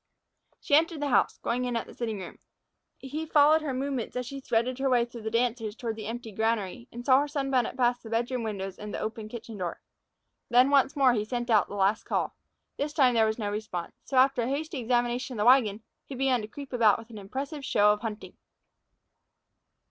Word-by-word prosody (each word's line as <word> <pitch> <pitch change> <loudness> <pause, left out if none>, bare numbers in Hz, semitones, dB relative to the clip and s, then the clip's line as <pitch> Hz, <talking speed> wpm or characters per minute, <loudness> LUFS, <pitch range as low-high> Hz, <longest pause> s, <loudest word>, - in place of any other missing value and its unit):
She - - -4
entered 325 +1 +4
the 290 0 -1
house, - - +2
going 245 +2 0
in 245 -1 -2
at 230 - -1
the - - -13
sitting 225 -3 -3
room. 185 -2 -9 0.6
He 290 +4 -5
followed 305 +1 +5
her 300 -3 -3
movements 265 -2 -3
as 250 0 -2
she 275 +3 -6
threaded 245 +1 0
her 270 0 +1
way 245 -2 +3
through 235 -1 -10
the 220 - -3
dancers 230 -2 -1
toward 230 -2 -4
the 215 -2 -7
empty 230 0 -6
granary, 220 +1 -1
and 240 +1 -8
saw 260 -1 +6
her 290 - 0
sunbonnet 270 -4 -1
pass 245 -1 +2
the 225 - -10
bedroom 240 +2 -1
window 200 -3 -4
and 210 0 -6
the - - -4
open 220 0 -5
kitchen 225 -2 -8
door. 175 -2 -4 0.7
Then 250 +3 +5
once 275 0 +4
more 270 -3 +5
he 210 -3 0
sent 240 +2 -3
out 215 - +4
the - - -8
last 200 +2 +2
call. - - -1 0.4
This 290 +1 -2
time 260 -5 +4
there 225 -1 +4
was 220 - -1
no 205 -3 -2
response. 205 -5 -5
So, 270 - -2
after 265 -1 +4
a 235 - -1
hasty 300 +2 -3
examination 245 +1 0
of 210 - 0
the - - +2
wagon, 225 -5 +4 0.2
he 275 - -8
began 255 -2 +1
to 210 - -6
creep 275 +4 -10
about 225 -4 +4
with 230 +1 -12
an 215 - -8
impressive 275 +9 -5
show 210 -4 +4
of 210 - -6
hunting. 220 -2 -6
240 Hz, 220 wpm, -28 LUFS, 220-265 Hz, 0.7 s, saw